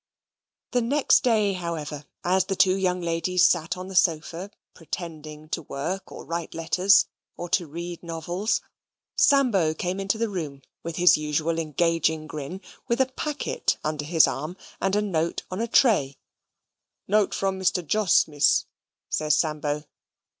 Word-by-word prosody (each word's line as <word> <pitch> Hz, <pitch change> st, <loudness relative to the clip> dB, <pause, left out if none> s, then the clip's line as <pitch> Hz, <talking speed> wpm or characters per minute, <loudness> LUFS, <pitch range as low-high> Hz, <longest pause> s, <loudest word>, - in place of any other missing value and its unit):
The 245 Hz, -, +2 dB
next 275 Hz, +5 st, +3 dB
day, 215 Hz, -5 st, +2 dB
however, 155 Hz, -5 st, -5 dB, 0.2 s
as 185 Hz, +1 st, +2 dB
the 195 Hz, 0 st, -2 dB
two 190 Hz, 0 st, +4 dB
young 180 Hz, -2 st, 0 dB
ladies 170 Hz, +2 st, +2 dB
sate 170 Hz, 0 st, 0 dB
on 185 Hz, 0 st, -6 dB
the 190 Hz, -, -8 dB
sofa, 170 Hz, +2 st, +1 dB, 0.2 s
pretending 155 Hz, -2 st, -7 dB
to 165 Hz, -, -2 dB
work, 165 Hz, +6 st, -5 dB
or -, -, -9 dB
to -, -, -17 dB
write 170 Hz, 0 st, -4 dB
letters, 185 Hz, +4 st, +4 dB, 0.3 s
or 175 Hz, -, -5 dB
to 175 Hz, -1 st, +1 dB
read 170 Hz, +3 st, -6 dB
novels, 175 Hz, +5 st, -2 dB, 0.5 s
Sambo 230 Hz, -, +3 dB
came 180 Hz, +3 st, -3 dB
into 195 Hz, +2 st, 0 dB
the 230 Hz, +1 st, 0 dB
room 155 Hz, -9 st, -5 dB, 0.2 s
with 170 Hz, -1 st, -5 dB
his 180 Hz, -1 st, +6 dB
usual 155 Hz, +2 st, -1 dB
engaging 160 Hz, 0 st, 0 dB
grin, 155 Hz, +5 st, -6 dB, 0.3 s
with 235 Hz, 0 st, 0 dB
a 265 Hz, 0 st, +2 dB
packet 295 Hz, +2 st, -2 dB
under 155 Hz, -1 st, -2 dB
his 160 Hz, +1 st, +5 dB
arm, 155 Hz, +7 st, -4 dB, 0.2 s
and 195 Hz, +1 st, +1 dB
a 210 Hz, -, +2 dB
note 170 Hz, -5 st, -1 dB
on 185 Hz, +4 st, -3 dB
a 230 Hz, -, -1 dB
tray. 195 Hz, -, +3 dB, 0.9 s
"Note 210 Hz, 0 st, +2 dB
from 195 Hz, -1 st, -1 dB
Mr. 185 Hz, -2 st, +1 dB
Jos, 210 Hz, +3 st, +3 dB
Miss," 145 Hz, -2 st, +3 dB, 0.4 s
says 150 Hz, -1 st, +1 dB
Sambo. 150 Hz, -2 st, -1 dB
175 Hz, 155 wpm, -25 LUFS, 155-195 Hz, 0.9 s, his